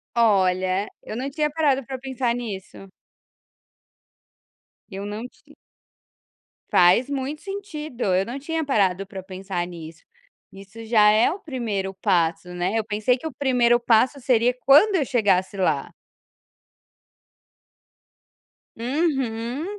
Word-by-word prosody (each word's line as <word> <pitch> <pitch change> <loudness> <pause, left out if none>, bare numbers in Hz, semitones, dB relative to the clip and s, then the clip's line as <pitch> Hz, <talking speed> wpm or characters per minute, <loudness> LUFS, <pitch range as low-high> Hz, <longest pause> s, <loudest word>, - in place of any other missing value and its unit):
Olha, 190 -3 +2
eu 215 - -7
não 265 +3 -3
tinha 300 0 0
parado 285 -4 +1
para 265 +1 -5
pensar 255 -2 -2
nisso. 195 -4 -7 2.0
Eu 195 +1 -6
não 210 +3 -5 1.5
Faz 185 +10 +4
muito 280 +2 -4
sentido, 320 -10 -6
eu 190 +1 +2
não 245 +5 -6
tinha 320 +3 -3
parado 195 -8 +1
para 190 -1 -8
pensar 185 -2 -4
nisso. 165 -2 -11 0.5
Isso 195 +4 -12
já 215 -2 +5
é 215 +6 +4
o 380 - -6
1º 220 - -4
passo, 175 -2 0
né, 180 +5 -1
eu 220 - 0
pensei 215 +4 0
que 320 - -6
o - - -6
1º 245 -3 +2
passo 240 +4 +2
seria 245 -1 +2
quando 380 +9 +6
eu 295 -6 +1
chegasse 205 -7 +1
lá. 160 -7 0 2.9
Uhum. 255 -1 -2
230 Hz, 120 wpm, -23 LUFS, 195-270 Hz, 2.9 s, quando